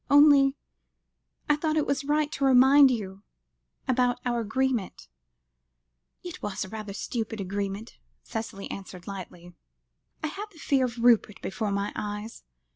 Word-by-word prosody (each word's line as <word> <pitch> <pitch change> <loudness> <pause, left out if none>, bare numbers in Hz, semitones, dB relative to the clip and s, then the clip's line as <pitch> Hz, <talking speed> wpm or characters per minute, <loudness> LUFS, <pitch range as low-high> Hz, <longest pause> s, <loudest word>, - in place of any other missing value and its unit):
Only 285 -1 +6 0.9
I 295 - +4
thought 310 +1 -1
it 305 - +2
was 280 0 -1
right 300 +1 +1
to 275 - -4
remind 270 +2 +7
you 200 -5 -3 0.7
about 250 -1 +2
our 240 -1 0
agreement." 235 -1 -1 1.2
"It 355 0 -8
was 205 -1 -3
rather 215 +1 -7
a - - -5
stupid 225 -1 -4
agreement," 200 +3 -4 0.2
Cicely 220 -3 -5
answered 185 -2 -8
lightly. 180 -3 -9 0.7
"I - - +1
had 400 +6 -6
the 340 - -19
fear 275 -3 +2
of 235 -1 -5
Rupert 230 -4 +4
before 215 +2 -2
my 200 0 -2
eyes. 210 +2 -5
235 Hz, 140 wpm, -27 LUFS, 200-275 Hz, 1.2 s, remind